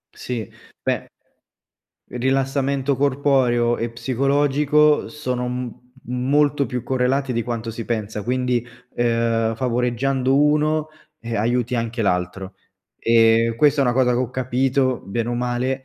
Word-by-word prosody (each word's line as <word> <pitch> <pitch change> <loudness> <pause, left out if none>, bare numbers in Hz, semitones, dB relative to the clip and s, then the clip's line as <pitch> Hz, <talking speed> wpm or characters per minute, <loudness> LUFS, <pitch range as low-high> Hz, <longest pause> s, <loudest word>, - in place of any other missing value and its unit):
Sì, 115 -5 -5 0.4
beh, - - -2 1.0
rilassamento 135 +1 0
corporeo 130 -4 +2
e 115 - -1
psicologico 140 +4 +2
sono 125 -4 -3
m 125 -1 -5 0.3
molto 140 +3 +1
più 125 -3 -4
correlati 130 +1 0
di 115 -1 -1
quanto 115 -1 -4
si 115 0 -6
pensa, 105 -3 -3
quindi, 125 -1 0 0.3
uhm, 115 -1 +1
favoreggiando 125 +2 0
uno, 150 +1 +2 0.3
ehm, 115 -1 -4
aiuti 120 +3 0
anche 115 0 -2
l’altro, 95 0 -2 0.4
e 115 0 +4
questa 145 +1 +3
è - - +4
una 120 - +2
cosa 125 -1 +2
che 120 - +1
ho 125 - -1
capito, 130 0 0
bene 115 +4 -3
o 120 - -1
male, 125 +2 -2
125 Hz, 130 wpm, -21 LUFS, 115-135 Hz, 1.0 s, e